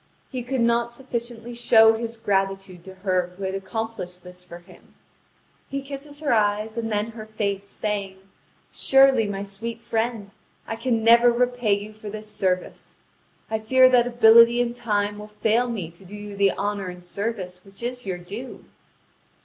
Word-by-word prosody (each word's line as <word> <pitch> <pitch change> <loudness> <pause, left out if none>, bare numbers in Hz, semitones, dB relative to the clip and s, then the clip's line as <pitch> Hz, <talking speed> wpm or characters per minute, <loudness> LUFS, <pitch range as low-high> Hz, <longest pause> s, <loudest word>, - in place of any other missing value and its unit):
He 255 -2 -3
could 250 +1 -2
not 235 0 +2
sufficiently 240 -2 -6
show 225 -2 +6
his 230 +1 -4
gratitude 195 -4 -1
to 190 0 -10
her 180 -1 0
who 195 - -7
had 190 0 -2
accomplished 195 -2 -5
this 180 0 -12
for 175 -1 -10
him. 175 - -19 0.7
He 275 0 -4
kisses 285 +2 -6
her 290 -4 +1
eyes, 215 0 +1
and 225 -1 -3
then 210 +2 -1
her 220 -1 -9
face, 200 -2 -2
saying: 200 -2 -3 0.5
"Surely, 270 -4 +4
my 200 -1 -4
sweet 225 +4 -6
friend, 225 -3 -2 0.3
I 225 - -4
can 230 -1 -1
never 235 +1 +7
repay 245 -2 +1
you 205 +2 -3
for 215 0 -9
this 215 0 -7
service. 185 -3 -2 0.5
I 220 - -2
fear 255 +4 +5
that 245 -1 +4
ability 235 0 +7
and 240 -1 0
time 205 -3 -1
will 210 - -8
fail 220 +3 +1
me 190 -8 -4
to 170 +3 -14
do 195 +3 -10
you 205 -1 -8
the 200 -1 +3
honour 205 -1 -2
and 180 0 -9
service 185 -2 -4
which 195 +3 -14
is 245 +1 -4
your 185 -3 -3
due." 205 +9 -9
220 Hz, 175 wpm, -24 LUFS, 195-235 Hz, 0.7 s, never